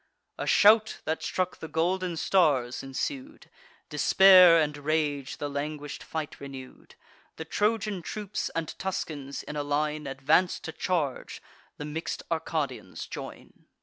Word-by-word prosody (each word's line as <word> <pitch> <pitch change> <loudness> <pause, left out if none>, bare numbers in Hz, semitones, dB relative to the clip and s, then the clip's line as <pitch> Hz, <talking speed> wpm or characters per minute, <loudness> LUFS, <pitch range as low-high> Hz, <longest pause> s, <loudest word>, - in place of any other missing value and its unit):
A - - -3
shout, 215 +1 +5
that 160 +1 -2
struck 185 -1 -2
the 160 - -7
golden 175 +2 -1
stars, 140 -10 +2
ensued; 270 - -5 0.4
Despair 185 -3 +7
and 150 -1 0
rage 145 -2 -1
the 145 - -3
languish'd 145 0 -5
fight 160 -2 -5
renew'd. 135 -2 -11 0.4
The 160 - -7
Trojan 210 +1 0
troops 205 +3 -4
and 165 -1 -2
Tuscans, 150 -7 -4
in 150 - -7
a 145 - -1
line, 150 +1 -1
Advance 135 +7 +2
to 160 - -6
charge; 160 -7 -2 0.4
the 145 - -6
mix'd 155 +2 -4
Arcadians 160 -2 -3
join. - - -10
160 Hz, 130 wpm, -28 LUFS, 145-185 Hz, 0.4 s, Despair